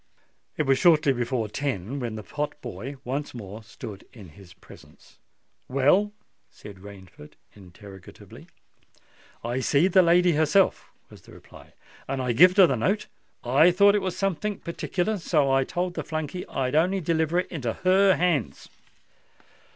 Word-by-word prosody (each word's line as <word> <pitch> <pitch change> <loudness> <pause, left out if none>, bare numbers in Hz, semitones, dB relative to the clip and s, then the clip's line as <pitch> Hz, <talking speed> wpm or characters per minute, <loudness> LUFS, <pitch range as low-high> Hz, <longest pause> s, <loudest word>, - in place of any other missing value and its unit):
It 155 - +1
was 135 -2 +2
shortly 155 -5 +4
before 120 -2 -2
ten 130 0 -4
when 120 -4 -4
the 110 - -7
pot 150 +4 -5
boy 130 +1 -8
once 135 +2 -4
more 105 -1 -9
stood 105 -1 -10
in 100 -7 -13
his 90 +3 -17
presence. 95 - -18 0.5
"Well?" 145 +11 +2 0.4
said 100 -2 -13
Rainford, 95 -6 -14 0.2
interrogatively. 95 0 -14 1.0
"I 120 +2 -2
seed 145 +8 +2
the 185 - +6
lady 175 +1 +4
herself," 160 +5 +1 0.2
was - - -15
the - - -17
reply; - - -16 0.3
"and 135 0 -3
I 125 -2 -1
gived 180 - +5
her 195 - +8
the 135 - 0
note. 200 - -1 0.4
I 135 +8 +4
thought 200 +3 +4
it 205 - +1
was 185 -2 -4
somethink 195 +1 -3
partickler—and 180 +3 -3
so 150 -5 +1
I 135 0 +3
told 175 +5 -3
the 160 - -5
flunkey 155 +4 -5
I'd 130 0 -2
on'y 180 +6 +2
deliver 160 0 0
it 180 - -2
into 125 -9 -3
her 190 +1 +3
hands." 170 - -1
145 Hz, 155 wpm, -25 LUFS, 120-180 Hz, 1.0 s, her